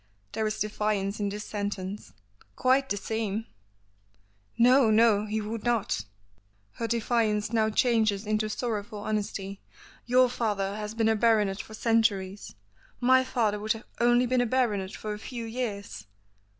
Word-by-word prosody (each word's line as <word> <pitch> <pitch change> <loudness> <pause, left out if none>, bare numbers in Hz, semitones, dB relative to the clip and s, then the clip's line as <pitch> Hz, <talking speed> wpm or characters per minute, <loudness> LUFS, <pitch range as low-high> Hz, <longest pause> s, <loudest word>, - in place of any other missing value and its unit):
There 220 - -1
is 215 0 -2
defiance 210 -1 -1
in 205 -1 0
this 210 +1 -5
sentence. 205 -1 -4 0.4
"Quite 265 +1 +2
the 205 - 0
same!" 220 0 -3 1.1
"No, 250 0 +5
no, 215 -1 +4
he 215 +1 -1
would 215 +1 -5
not," 230 - 0 0.7
her 230 - -4
defiance 225 -2 0
now 220 -1 +3
changes 220 -3 +2
into, 215 0 0
sorrowful 215 -1 -3
honesty. 205 -2 -3 0.5
"Your 255 +1 +5
father 205 -5 -1
has 210 0 -5
been 225 -1 +2
a 220 - +3
baronet 215 -3 +2
for 220 - -11
centuries, 210 - 0 0.4
my 260 +1 +5
father 220 -5 0
would 215 +1 0
have 225 0 -10
only 240 +1 +4
been 250 0 +2
a 245 - +1
baronet 215 -6 0
for 215 -1 -5
a 210 - -7
few 235 +1 -6
years." 200 - -5
215 Hz, 150 wpm, -28 LUFS, 205-235 Hz, 1.1 s, No